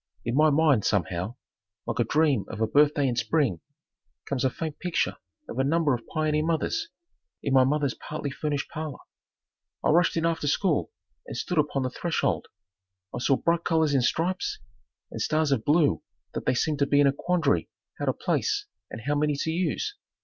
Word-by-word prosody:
In 120 Hz, -, -1 dB
my 155 Hz, +3 st, +5 dB
mind, 145 Hz, -7 st, +3 dB
somehow, 95 Hz, +2 st, -1 dB, 0.5 s
like -, -, -3 dB
a -, -, +5 dB
dream 150 Hz, -3 st, +2 dB
of 110 Hz, -, -7 dB
a 110 Hz, -, +3 dB
birthday 145 Hz, +4 st, +3 dB
in 125 Hz, -, 0 dB
spring, 120 Hz, -, +1 dB, 0.7 s
comes 135 Hz, -3 st, -2 dB
a 130 Hz, -, +3 dB
faint 155 Hz, +3 st, -5 dB
picture 180 Hz, -2 st, -1 dB, 0.3 s
of -, -, -5 dB
a -, -, +4 dB
number 155 Hz, 0 st, +2 dB
of 120 Hz, -2 st, -4 dB
pioneer 155 Hz, -1 st, 0 dB
mothers, 170 Hz, -, -1 dB, 0.5 s
in 140 Hz, -, 0 dB
my 130 Hz, -1 st, +7 dB
mother's 140 Hz, 0 st, +1 dB
partly 150 Hz, -2 st, -5 dB
furnished 145 Hz, 0 st, -2 dB
parlor. 155 Hz, -3 st, -5 dB, 0.9 s
I -, -, +2 dB
rushed 170 Hz, +1 st, +3 dB
in 165 Hz, -, +1 dB
after 165 Hz, -3 st, 0 dB
school 165 Hz, -, +1 dB, 0.4 s
and -, -, -6 dB
stood 180 Hz, -3 st, -1 dB
upon 145 Hz, -2 st, +1 dB
the 130 Hz, -, -2 dB
threshold. 170 Hz, -1 st, -1 dB, 0.7 s
I -, -, -3 dB
saw 135 Hz, +2 st, +3 dB
bright 170 Hz, 0 st, +1 dB
colors 160 Hz, -3 st, +2 dB
in 135 Hz, -, +3 dB
stripes, 175 Hz, +8 st, 0 dB, 0.5 s
and -, -, -5 dB
stars 155 Hz, -1 st, +1 dB
of 125 Hz, -5 st, +1 dB
blue 150 Hz, +1 st, +3 dB, 0.3 s
that -, -, -5 dB
they 125 Hz, -, +3 dB
seemed 150 Hz, +3 st, 0 dB
to 140 Hz, -, +2 dB
be 145 Hz, -, +3 dB
in 145 Hz, -, +6 dB
a 135 Hz, -, +4 dB
quandary 165 Hz, -1 st, +1 dB, 0.3 s
how -, -, -1 dB
to -, -, +2 dB
place 415 Hz, -2 st, -1 dB, 0.2 s
and 110 Hz, -, -7 dB
how 145 Hz, +6 st, -1 dB
many 150 Hz, 0 st, +1 dB
to 160 Hz, -, -1 dB
use. 185 Hz, -, -1 dB
150 Hz, 190 wpm, -27 LUFS, 135-160 Hz, 0.9 s, my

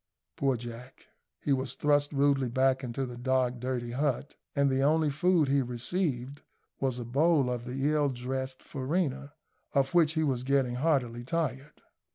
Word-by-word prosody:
Poor 135 Hz, -3 st, +1 dB
Jack! 120 Hz, +2 st, -10 dB, 0.3 s
He 145 Hz, -, +1 dB
was 130 Hz, 0 st, -2 dB
thrust 145 Hz, -1 st, +2 dB
rudely 140 Hz, -2 st, +2 dB
back 130 Hz, +2 st, +2 dB
into 130 Hz, +2 st, -3 dB
his 125 Hz, -1 st, -8 dB
dark, 125 Hz, 0 st, 0 dB
dirty 125 Hz, -1 st, -3 dB
hut, 140 Hz, +2 st, -1 dB, 0.2 s
and 140 Hz, -1 st, +3 dB
the 135 Hz, 0 st, +1 dB
only 155 Hz, +1 st, +3 dB
food 165 Hz, +1 st, +3 dB
he 140 Hz, +1 st, +3 dB
received 130 Hz, +2 st, -2 dB, 0.4 s
was 130 Hz, -2 st, 0 dB
a 120 Hz, -, -5 dB
bowl 140 Hz, +1 st, +3 dB
of 120 Hz, -1 st, -4 dB
the 135 Hz, +3 st, -1 dB
ill 150 Hz, -2 st, +2 dB
dressed 130 Hz, +1 st, -4 dB
farina, 140 Hz, 0 st, -2 dB, 0.4 s
of 135 Hz, -1 st, +2 dB
which 165 Hz, -3 st, +4 dB
he 160 Hz, -1 st, +1 dB
was 130 Hz, -5 st, 0 dB
getting 130 Hz, -2 st, +1 dB
heartily 125 Hz, -5 st, 0 dB
tired. 140 Hz, 0 st, -3 dB
135 Hz, 165 wpm, -29 LUFS, 125-145 Hz, 0.4 s, which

